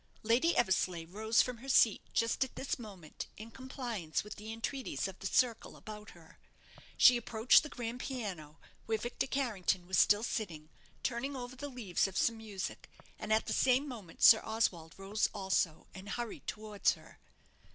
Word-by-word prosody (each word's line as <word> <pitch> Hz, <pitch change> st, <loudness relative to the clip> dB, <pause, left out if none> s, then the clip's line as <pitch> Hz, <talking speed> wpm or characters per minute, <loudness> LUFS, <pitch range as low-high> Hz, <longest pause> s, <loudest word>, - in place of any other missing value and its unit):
Lady 245 Hz, +10 st, +3 dB
Eversleigh 185 Hz, -6 st, +1 dB
rose 220 Hz, +6 st, +2 dB
from 250 Hz, -2 st, -5 dB
her 270 Hz, +3 st, -9 dB
seat 225 Hz, -5 st, +5 dB
just 230 Hz, +3 st, +1 dB
at 265 Hz, -, -8 dB
this 270 Hz, -, -3 dB
moment, 195 Hz, -9 st, -9 dB
in 220 Hz, +2 st, -9 dB
compliance 240 Hz, -, -4 dB
with 210 Hz, 0 st, -8 dB
the 215 Hz, +1 st, -8 dB
entreaties 230 Hz, +1 st, -3 dB
of 190 Hz, -1 st, -10 dB
the 195 Hz, -, -3 dB
circle 240 Hz, +1 st, +1 dB
about 210 Hz, -1 st, -9 dB
her. 165 Hz, 0 st, -18 dB, 0.6 s
She 250 Hz, -1 st, +8 dB
approached 230 Hz, 0 st, +4 dB
the 305 Hz, -, -7 dB
grand 240 Hz, -1 st, -5 dB
piano, 190 Hz, -, -5 dB, 0.3 s
where 220 Hz, 0 st, +1 dB
Victor 240 Hz, +5 st, -3 dB
Carrington 210 Hz, -10 st, -1 dB
was 185 Hz, +1 st, +1 dB
still 210 Hz, +1 st, +5 dB
sitting, 165 Hz, -10 st, -4 dB, 0.3 s
turning 260 Hz, +3 st, -2 dB
over 250 Hz, 0 st, -6 dB
the 285 Hz, +3 st, -6 dB
leaves 220 Hz, -9 st, 0 dB
of 190 Hz, -, -6 dB
some 230 Hz, -1 st, +2 dB
music, 210 Hz, -4 st, -6 dB, 0.3 s
and -, -, -5 dB
at 220 Hz, +1 st, +3 dB
the -, -, -2 dB
same 260 Hz, +3 st, +3 dB
moment 210 Hz, -11 st, -8 dB
Sir 220 Hz, -, +9 dB
Oswald 180 Hz, -8 st, -1 dB
rose 195 Hz, +2 st, 0 dB
also, 190 Hz, -5 st, 0 dB
and 195 Hz, +1 st, -9 dB
hurried 240 Hz, 0 st, -5 dB
towards 210 Hz, -1 st, 0 dB
her. -, -, -16 dB
220 Hz, 170 wpm, -33 LUFS, 190-245 Hz, 0.6 s, Sir